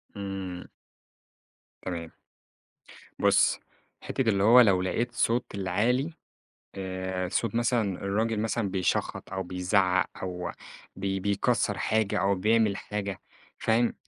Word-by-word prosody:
امم. 95 -3 -5 1.2
تمام. 85 -3 -5 1.1
بُص، - - +4 0.4
حتة - - -3
اللي 100 -2 +2
هو 120 +4 +8
لو 95 -6 +4
لَقيت 115 +6 -1
صوت 120 +1 +1
العالي 115 - 0 0.6
آآ، 95 -1 -3
صوت 115 +5 -1
مثلًا 120 0 +2 0.2
الراجل 110 +2 0
مثلًا 110 -1 -1
بيشَخّط 95 -1 -1
أو 95 +1 -2
بيزَعَّق، 90 +1 +1 0.2
أو 90 -1 -4 0.5
بي 95 0 -2
بيكسَّر 100 +1 +1
حاجة 110 -1 +1
أو 100 +1 +2
بيعمل 105 +1 +2
حاجة، 100 -2 -4 0.4
فاهم، 115 +2 +2
100 Hz, 110 wpm, -28 LUFS, 95-110 Hz, 1.2 s, هو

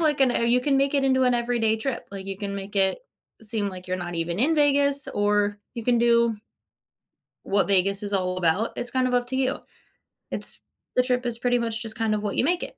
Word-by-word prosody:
like 300 -4 +1
an, 255 -2 +4
"Oh, - - 0
you 240 +2 +3
can 275 +1 +1
make 275 +1 +1
it 275 -1 +2
into 260 -1 +3
an 250 - +3
everyday 235 -2 +1
trip." 255 +3 -4
Like, 195 -1 -7
you 195 -1 -5
can 200 -1 -4
make 200 +1 -7
it 190 -1 +3 0.4
seem 215 -2 0
like 185 -1 -9
you're 185 - -1
not 175 -1 -5
even 170 +2 -2
in 320 +5 +3
Vegas, 285 -1 +3
or 205 0 +1 0.2
you 235 - -5
can 245 -1 +3
do 235 -1 +3 1.1
what 200 0 +1
Vegas 195 +1 +2
is 205 0 -3
all 185 -1 0
about, 185 +6 +1
it's 240 - -5
kind 255 -1 +1
of 250 - -2
up 245 0 +1
to 260 - -3
you. 265 +1 0 0.7
It's - - -3 0.3
the 250 - +4
trip 250 0 0
is 235 -1 -3
pretty 245 0 +1
much 225 -1 -2
just 220 -1 -3
kind 220 -1 +1
of 210 - -2
what 205 -1 -3
you - - +4
make 350 +4 +1
it. - - -8
230 Hz, 240 wpm, -25 LUFS, 200-255 Hz, 1.1 s, an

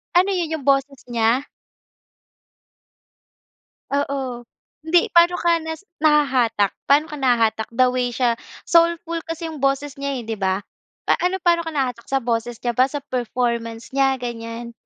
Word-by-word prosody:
Ano 375 +3 +4
yun, 320 -3 -2
yung 270 - -13
boses 275 0 +2
niya? 235 +3 +2 2.5
Oo, 270 -4 -2 0.4
hindi 340 +2 +3
pa'no 345 +1 +5
ka 340 -1 +3
nas 320 +1 -5 0.2
nahahatak, 255 -9 +3
pa'no 295 +3 +3
ka 300 - -6
nahahatak 230 -4 +1
the 255 +1 +4
way 250 -1 -1
siya 235 -1 +1 0.3
soulful 335 0 +3
kasi 330 0 -5
yung 310 - -7
boses 275 +1 -1
niya, 275 -3 -3
eh, - - -11
di 225 -2 -3
ba? 190 0 0 0.5
Pa - - +4
ano 365 +1 -1
paano 340 -1 +2
ka 325 - -4
nahatak 250 -4 -2
sa 270 -1 0
boses 235 0 -2
niya 240 -1 -2
ba, 255 - +6
sa 285 +1 -5
performance 235 -3 -2
niya, 270 -1 +1
ganiyan? 235 0 -6
270 Hz, 155 wpm, -22 LUFS, 235-310 Hz, 2.5 s, ba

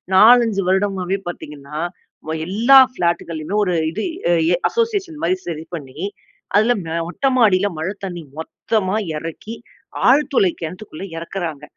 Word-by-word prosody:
4,5 225 -1 +6
வருடமாவே 190 0 0
பார்த்தீங்கன்னா, 150 -3 -8 0.7
எல்லா 230 +8 +5 0.2
ஃபிளாட்டுகள்லையும் 170 0 -1
ஒரு 180 - 0 0.2
இது - - -4 0.5
எ - - +5
அசோசியேஷன் 405 -8 -1
மாரி 180 +2 +2
சரி 160 -2 -4
பண்ணி 140 -3 -9 0.6
அதில 220 +4 +5 0.2
அ - - -1
மொட்ட 225 +10 -1
மாடியில 205 -5 +4
மழை 170 +5 -2
தண்ணி 175 -3 -5 0.2
மொத்தமா 190 +4 -2 0.2
இறக்கி, 165 +8 -7 0.5
ஆழ்துளை 275 -7 +4
கிணத்துக்குள்ள 180 +2 -7
இறக்குறாங்க. 165 -3 -5
190 Hz, 115 wpm, -20 LUFS, 165-225 Hz, 0.7 s, 4,5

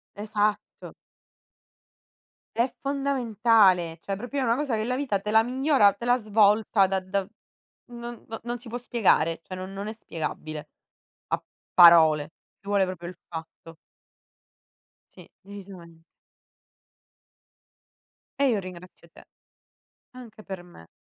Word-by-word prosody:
Esatto. 210 0 -2 1.6
È 235 +3 +2
fondamentale, 225 -10 +2
cioè, 195 -1 -4
proprio 245 +6 -4
è - - +1
una 230 -2 +2
cosa 280 -5 -1
che 215 - -1
la 250 +3 -1
vita 250 -9 -1
te 210 - -3
la 220 +1 +6
migliora, 255 -3 +3
te - - -12
la 245 +1 +3
svolta 210 -2 +3
da 190 0 0
da 190 +1 -2 0.7
non 240 0 -9
n 225 - -6
non 240 0 -4
si 245 - -13
può 235 - -4
spiegare, 200 -9 +1
cioè, 185 - -9
non 185 +1 -7
non 200 +1 -6
è 215 - -4
spiegabile. 155 -6 -6 0.6
A - - -1 0.3
parole, 160 -3 +7 0.3
ci 200 - -13
vuole 200 -1 +3
proprio 180 -2 -6
il 180 - -10
fatto. 165 0 -10 1.4
Sì, - - -15
decisame 185 -4 -12 2.4
E 280 -1 +4
io 220 -4 +1
ringrazio 180 -2 -11
te. - - -16 0.9
Anche 230 -4 -12
per 190 -3 -7
me. 175 - -16
205 Hz, 130 wpm, -26 LUFS, 180-235 Hz, 2.4 s, parole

